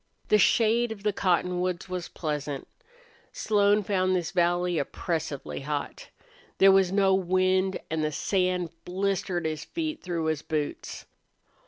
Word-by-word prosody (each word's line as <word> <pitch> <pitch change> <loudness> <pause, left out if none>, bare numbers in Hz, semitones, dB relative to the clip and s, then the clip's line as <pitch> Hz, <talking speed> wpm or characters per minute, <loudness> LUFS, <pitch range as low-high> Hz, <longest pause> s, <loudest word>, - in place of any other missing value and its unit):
The 210 - +5
shade 230 +3 +3
of 205 -2 -8
the 210 -1 +1
cotton 180 -1 +1
woods 180 -1 -2
was 185 -1 -4
pleasant. 150 -3 -4 0.6
Slone 205 0 +2
found 185 -1 +1
this 175 -2 -2
valley 175 -1 +1
oppressively 155 0 -3
hot. 145 +1 -5 0.5
There 195 0 +7
was 190 -2 +4
no 195 -1 +3
wind 185 +1 +1
and 160 -1 0
the 155 - 0
sand 180 +1 0
blistered 185 -2 -1
his 155 -1 -2
feet 315 -2 -4
through 170 -3 -3
his 155 -1 0
boots. 155 -3 -4
180 Hz, 140 wpm, -27 LUFS, 165-195 Hz, 0.6 s, There